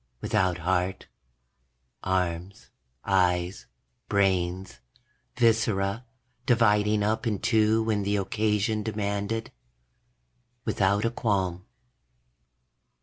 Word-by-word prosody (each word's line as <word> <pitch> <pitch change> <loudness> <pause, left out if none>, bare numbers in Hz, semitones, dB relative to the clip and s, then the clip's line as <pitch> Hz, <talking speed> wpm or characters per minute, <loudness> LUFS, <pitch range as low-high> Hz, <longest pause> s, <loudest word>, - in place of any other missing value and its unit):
Without 90 +4 0
heart, 90 +2 -1 1.0
arms, 90 0 -2 0.3
eyes, 90 -1 +1 0.4
brains, 95 -6 0 0.6
viscera, 110 -2 +1 0.4
dividing 105 -3 +3
up 110 +2 0
in 105 -3 0
two 110 +2 +2
when 110 -2 0
the 100 +1 0
occasion 105 +2 0
demanded. 105 +1 -3 1.1
Without 100 +2 +1
a 115 - +1
qualm. 95 -6 -1
100 Hz, 80 wpm, -27 LUFS, 95-110 Hz, 1.1 s, dividing